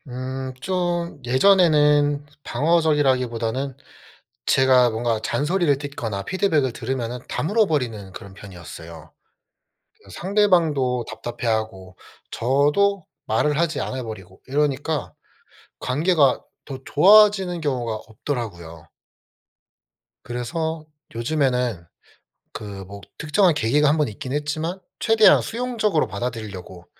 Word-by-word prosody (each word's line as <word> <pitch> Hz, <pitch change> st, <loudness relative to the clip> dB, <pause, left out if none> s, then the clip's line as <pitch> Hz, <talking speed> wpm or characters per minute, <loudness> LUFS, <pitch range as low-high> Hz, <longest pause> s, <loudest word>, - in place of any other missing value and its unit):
음. 130 Hz, +1 st, -5 dB
좀 175 Hz, -3 st, -2 dB
예전에는 150 Hz, -1 st, +4 dB, 0.2 s
방어적이라기보다는 135 Hz, -5 st, +1 dB, 0.7 s
제가 130 Hz, -2 st, +4 dB
뭔가 115 Hz, -1 st, -1 dB
잔소리를 150 Hz, +3 st, +1 dB
듣거나 120 Hz, -9 st, -5 dB
피드백을 155 Hz, -, 0 dB
들으면 125 Hz, -1 st, -4 dB
다물어 210 Hz, +6 st, +1 dB
버리는 115 Hz, -, -2 dB
그런 95 Hz, +1 st, -10 dB
편이었어요. 85 Hz, -5 st, -11 dB, 0.8 s
그냥 -, -, -19 dB
상대방도 165 Hz, -, +1 dB
답답해하고 110 Hz, -5 st, -4 dB, 0.3 s
저도 150 Hz, +10 st, +1 dB, 0.2 s
말을 145 Hz, +7 st, +1 dB
하지 165 Hz, -2 st, 0 dB
않아 130 Hz, -1 st, -4 dB
버리고 95 Hz, -5 st, -9 dB
이러니까 145 Hz, +1 st, -1 dB, 0.7 s
관계가 145 Hz, 0 st, +2 dB, 0.2 s
더 135 Hz, -2 st, -7 dB
좋아지는 190 Hz, 0 st, +5 dB
경우가 125 Hz, -7 st, -2 dB
없더라고요. 100 Hz, -, -6 dB, 1.4 s
그래서 155 Hz, +7 st, -4 dB, 0.3 s
요즘에는 125 Hz, -, 0 dB, 0.7 s
그 110 Hz, -, -6 dB, 0.2 s
뭐 100 Hz, +1 st, -10 dB, 0.2 s
특정한 165 Hz, +3 st, +3 dB
계기가 145 Hz, +3 st, +2 dB
한 150 Hz, -, +3 dB
번 150 Hz, -4 st, +1 dB
있긴 125 Hz, +5 st, -7 dB
했지만 155 Hz, +5 st, -2 dB, 0.2 s
최대한 225 Hz, -1 st, +5 dB
수용적으로 225 Hz, -8 st, -1 dB
받아들이려고 100 Hz, -4 st, -6 dB
135 Hz, 275 characters per minute, -22 LUFS, 115-160 Hz, 1.4 s, 좋아지는